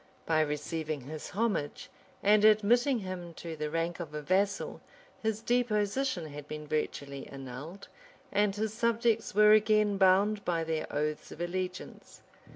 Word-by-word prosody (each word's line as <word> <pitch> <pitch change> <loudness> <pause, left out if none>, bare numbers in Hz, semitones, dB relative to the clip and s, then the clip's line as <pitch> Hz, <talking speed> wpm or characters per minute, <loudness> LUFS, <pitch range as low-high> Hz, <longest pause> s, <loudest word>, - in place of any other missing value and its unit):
By 160 -1 +3
receiving 150 0 -2
his 150 +4 -7
homage, 200 -8 -2 0.4
and 210 +1 +5
admitting 230 +5 +4
him 180 -3 -6
to 165 -2 -6
the 150 -1 -3
rank 165 +2 -2
of 155 -3 -6
a 150 - -3
vassal, 195 +6 0 0.4
his 220 0 -2
deposition 240 -3 0
had 145 0 -9
been 150 0 -6
virtually 140 -2 -3
annulled, 135 +8 -9 0.4
and 205 -1 +2
his 215 0 -2
subjects 230 -2 +1
were 210 0 +7
again 215 -1 +4
bound 200 +2 +4
by 170 -2 0
their 160 -1 -2
oaths 150 +1 -2
of - - -10
allegiance. 180 +1 -5
185 Hz, 145 wpm, -30 LUFS, 155-215 Hz, 0.4 s, were